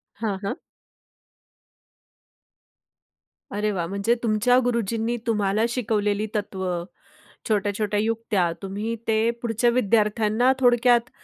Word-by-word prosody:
हां, 205 -2 -2
हां. 200 - -3 2.9
अरे 210 +1 -1
वाह! 175 -4 -2
म्हणजे 200 +5 0
तुमच्या 230 +3 +3
गुरुजींनी 230 0 -1
तुम्हाला 210 -1 +1
शिकवलेली 210 -3 0
तत्व, 195 -2 -3 0.8
छोट्या-छोट्या 205 0 0
युक्त्या, 215 -5 0
तुम्ही 205 +4 -3
ते 220 +1 +2
पुढच्या 235 0 +1
विद्यार्थ्यांना 220 +1 +2
थोडक्यात 245 -1 +4
215 Hz, 90 wpm, -24 LUFS, 205-235 Hz, 2.9 s, थोडक्यात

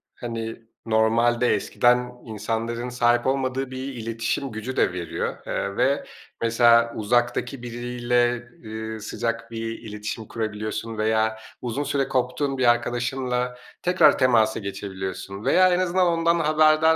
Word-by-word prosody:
hani, 115 -1 -5 0.2
normalde 115 +2 +3
eskiden 125 +4 +2
insanların 115 +2 -3
sahip 120 0 +2
olmadığı 135 0 -1
bir 130 - -6 0.2
iletişim 115 +3 -3
gücü 110 +4 -5
de - - +3
veriyor, 85 -3 -3
eee, 100 0 -2
ve 135 +3 +2 0.4
mesela, 115 0 +4
uzaktaki 120 +3 0
biriyle, 120 0 0 0.2
eee, 110 0 -5
sıcak 115 +2 -3
bir 115 0 -4
iletişim 105 +1 -6
kurabiliyorsun 110 0 -4
veya 110 0 +1 0.2
uzun 125 +4 -2
süre 140 -1 0
koptuğun 130 +2 -1
bir 130 - +1
arkadaşınla 125 +1 -1 0.2
tekrar 175 -5 +5
temasa 115 -4 +3
geçebiliyorsun 95 0 -6
veya 185 +7 +5
en 180 - +2
azından 185 0 +2
ondan 170 0 +2
haberdar 155 0 +4
120 Hz, 125 wpm, -24 LUFS, 110-130 Hz, 0.4 s, tekrar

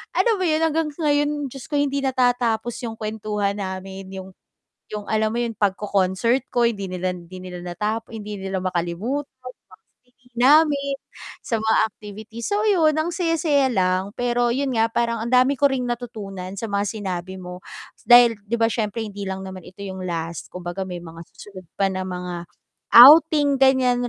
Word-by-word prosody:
alam 460 -3 +3
mo 370 - 0
'yon 310 0 +1
hanggang 320 0 +1
ngayon, 290 -2 0
Diyos 270 -1 -10
ko 295 - -4
hindi 280 -1 +1
natatapos 245 -3 +1
'yong 230 -2 -5
kwentuhan 210 -2 -3
namin. 190 0 -6
'Yong 190 0 -9 0.6
'yong 210 -1 -6
alam 220 0 +1
mo 240 - 0
'yong 230 -2 -4
pagko-concert 200 +5 +1
ko, 240 - 0
hindi 215 -5 0
nila 185 0 -2
hindi 180 +1 -9
nila 180 -1 -8
nata 210 +5 -2
hindi 210 -2 -7
nila 190 -1 -4
makalimutan. 185 +10 -2 0.2
Mga 255 0 -9 0.5
swimming 250 0 -30
namin, 280 0 +4 0.5
sa - - -1
mga 220 0 +2
activity. 215 +1 -11
So 415 - 0
'yon, 320 -7 +3
ang 330 +2 -1
saya-saya 320 -6 +1
lang 185 -2 0
pero 240 0 +1
'yon 265 +1 -1
nga, 225 0 +2
parang 235 -1 -1
ang 235 - -3
dami 255 +2 +4
ko 280 +1 +3
ring 255 -2 -1
natutunan 210 -6 -6
sa 225 - -3
mga 200 -1 -1
sinabi 190 -3 -5
mo, 180 0 -9 0.4
dahil 240 -1 +7
'di 225 +3 -3
ba 225 - +4
siyempre 220 0 -2
hindi 205 -1 -8
lang 190 0 -5
naman 190 -1 -8
ito 200 +3 -10
'yong 190 -1 -6
last. 165 -2 -5
Kumbaga 180 +1 -5
may 180 -2 -5
mga 165 -1 -10
susunod 195 -2 -12 0.2
pa 195 - +3
ng 190 0 -3
mga 180 -1 -5 0.5
outing, 290 +1 +8
ganiyan 255 -2 +3
220 Hz, 175 wpm, -22 LUFS, 190-260 Hz, 0.6 s, outing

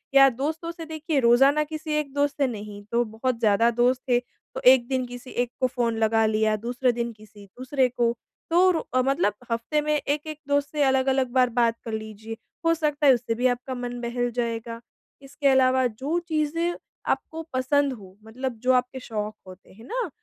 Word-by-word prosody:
या 275 0 +9
दोस्तों 310 +7 -3
से 330 -1 -9
देखिए, 315 -1 -2
रोज़ाना 270 +5 +5
किसी 310 0 -5
एक 280 -2 -4
दोस्त 285 0 +1
से 275 - +4
नहीं 205 -3 -7
तो 235 +1 +2
बहुत 230 +2 -2
ज़्यादा 225 +1 +4
दोस्त 250 +1 +3
थे, 245 - +4
तो 245 - -12
एक 245 -2 +3
दिन 260 -1 -1
किसी 245 +1 -10
एक 245 0 -1
को 255 - +3
फ़ोन 235 -2 -1
लगा 225 0 +3
लिया, 215 0 +2
दूसरे 245 +4 0
दिन 235 0 -3
किसी 210 -1 -16
दूसरे 255 +5 0
को। 240 -1 +1 0.4
तो 360 +3 +5
रू 330 - 0
अ, 255 - +4
मतलब 255 -6 +1 0.2
हफ़्ते 235 +7 0
में 300 0 0
एक-एक 295 +1 -2
दोस्त 285 0 +1
से 300 -2 +1
अलग-अलग 265 -1 +2
बार 255 -1 +3
बात 235 -1 +1
कर 225 - -5
लीजिए, 220 +1 -6 0.3
हो 330 - +5
सकता 300 -2 0
है 270 - +8
उससे 230 -2 -1
भी 250 +2 +2
आपका 255 +2 -7
मन 245 0 -5
बहल 245 0 -1
जाएगा। 230 -1 -3 0.4
इसके 280 +1 -2
अलावा 260 -1 +4
जो 270 +9 -2
चीज़ें 330 +1 -1 0.3
आपको 325 0 -2
पसंद 275 +2 +1
हों, 195 -6 -12
मतलब 240 +1 -5
जो 255 0 +4
आपके 250 +1 0
शौक 215 -3 -4
होते 185 +1 -14
हैं 225 +4 -15
ना, 480 -6 -3
255 Hz, 195 wpm, -25 LUFS, 230-285 Hz, 0.4 s, या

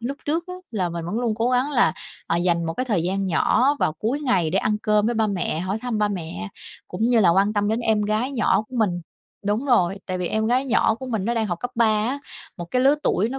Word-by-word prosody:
lúc 260 +4 -4
trước 325 +3 -1
á 365 - -6 0.2
là 190 -6 -1
mình 170 -1 -5
vẫn 190 +7 -3
luôn 235 -3 0
cố 230 +3 0
gắng 255 +3 +1
là, 240 - +3 0.3
à, 170 - 0
dành 170 -1 +1
một 165 0 -3
cái 255 - -1
thời 205 -9 +1
gian 195 +3 -1
nhỏ 250 - +2
vào - - +1
cuối 225 - -2
ngày 190 - +1
để - - +1
ăn 210 - +1
cơm 210 0 +2
với 240 - 0
ba 220 -1 +2
mẹ, 185 -5 -1
hỏi 190 +4 -2
thăm 245 -3 -2
ba 210 0 +2
mẹ, 160 - -5 0.4
cũng 180 +4 -5
như 235 0 +4
là 180 -5 +5
quan 195 +4 +3
tâm 205 -1 0
đến 225 +2 0
em 220 -2 +1
gái 215 +6 -1
nhỏ 230 -4 +2
của 255 - -7
mình. 190 -6 +1 0.5
Đúng 210 +6 0
rồi, 195 -8 +2
tại 185 -1 -3
vì 180 - -2
em 220 +4 0
gái 250 +3 +2
nhỏ 225 -3 +3
của 260 +3 -8
mình 220 -6 -2
nó 235 - 0
đang 225 -2 0
học 175 -3 -4
cấp 245 - -3
3 230 0 +3 0.2
á, 265 +5 -1 0.4
một 175 - -5
cái 250 - +2
lứa 275 +2 +5
tuổi 215 -6 +1
nó 270 +2 -5
215 Hz, 275 wpm, -23 LUFS, 185-245 Hz, 0.5 s, là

